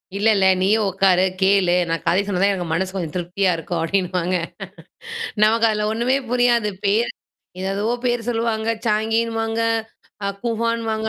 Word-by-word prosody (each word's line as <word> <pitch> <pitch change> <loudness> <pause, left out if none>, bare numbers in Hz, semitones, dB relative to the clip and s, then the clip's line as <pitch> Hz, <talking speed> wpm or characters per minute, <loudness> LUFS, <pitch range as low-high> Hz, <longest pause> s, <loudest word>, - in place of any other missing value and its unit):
இல்ல, 205 +2 +1
இல்ல! 195 -1 +2 0.2
நீயும் 210 +3 +2
உக்காரு, 190 -1 +3 0.2
கேளு! 190 -2 +3
நான் 165 0 -2
கதை 170 +3 +3
சொன்னாதான் 200 0 +1
எனக்கு 180 -3 -3
மனசு 185 +3 -1
கொஞ்சம் 170 -5 -4
திருப்தியா 180 +2 0
இருக்கும் 165 +1 -4
அப்பிடின்னுவாங்க. 180 +1 0 1.1
நமக்கு 225 +2 +4
அதுல 210 -1 0
ஒண்ணுமே 240 +4 +1
புரியாது. 240 -3 +2 0.2
பேரு 215 +4 +2 0.5
எது, 190 - -3
எதுவோ 210 +4 -1
பேரு 240 -1 0
சொல்லுவாங்க. 225 -1 -1 0.2
சாங்கின்னுவாங்க, 225 +1 0 0.6
அ - - 0 0.2
கூஹான்னுவாங்க. 230 -1 -1
210 Hz, 140 wpm, -21 LUFS, 185-225 Hz, 1.1 s, நமக்கு